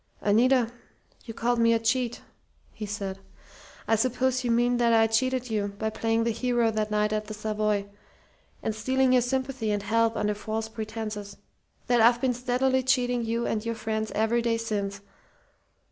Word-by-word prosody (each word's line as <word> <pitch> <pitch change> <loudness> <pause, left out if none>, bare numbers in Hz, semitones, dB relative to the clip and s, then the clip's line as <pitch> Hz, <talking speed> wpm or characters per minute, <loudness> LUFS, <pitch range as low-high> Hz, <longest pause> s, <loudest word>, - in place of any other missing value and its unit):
"Anita, 235 +3 +3 0.5
you 225 - -8
called 240 0 0
me 230 0 +4
a 230 - +2
cheat," 235 +1 -1 0.5
he 215 -1 -6
said. 195 -2 -4 0.7
"I 225 - +4
suppose 255 +2 0
you 245 - -1
mean 240 +1 +2
that 235 -1 +3
I 225 0 +5
cheated 250 +2 0
you 205 -2 -2
by 220 +1 -2
playing 225 +1 0
the 230 - +1
hero 240 0 +1
that 215 -1 -1
night 210 0 +1
at 215 0 -1
the 215 - -7
Savoy, 210 -1 -1 0.8
and 220 - -1
stealing 260 +4 +1
your 250 - +5
sympathy 260 -2 -2
and 205 -1 -1
help 230 +2 +1
under 210 0 0
false 220 +1 -4
pretenses; 215 -2 -6 0.5
that 245 -2 +3
I've 235 +1 +5
been 255 0 +1
steadily 255 +2 +1
cheating 245 -2 +1
you 230 +1 -1
and 215 -1 -1
your 230 0 -2
friends 220 -1 -3
every 225 +2 +2
day 230 -1 +1
since. 205 -3 -3
225 Hz, 175 wpm, -27 LUFS, 215-245 Hz, 0.8 s, I